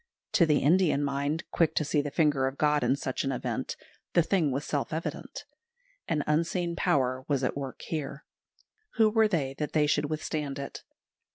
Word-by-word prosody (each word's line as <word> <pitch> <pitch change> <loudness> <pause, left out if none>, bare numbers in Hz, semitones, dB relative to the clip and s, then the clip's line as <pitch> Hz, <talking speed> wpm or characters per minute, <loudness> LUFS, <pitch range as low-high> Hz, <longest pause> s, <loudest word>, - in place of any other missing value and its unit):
To 170 - +4
the 150 -2 +3
Indian 160 -1 +3
mind, 145 +3 -1
quick 165 -2 +2
to 155 - +1
see 150 0 +2
the 145 - -4
finger 145 -3 +2
of 135 +1 -5
God 150 -1 +2
in - - +3
such 130 -2 -3
an 135 - -1
event, 125 - -3 0.4
the 170 - +5
thing 170 -3 +2
was 140 +2 -2
self 145 -2 -2
evident. 160 +1 -5 0.6
An 150 -2 0
unseen 170 +3 0
Power 130 -4 +1
was 140 -3 0
at 125 - 0
work 135 -2 -6
here. 150 -2 -5 0.7
Who 220 -2 +4
were 220 0 +4
they 150 -10 -1
that 150 - -3
they 150 -1 +4
should 150 0 +1
withstand 150 -2 -3
it? 140 0 -6
150 Hz, 185 wpm, -29 LUFS, 140-160 Hz, 0.7 s, the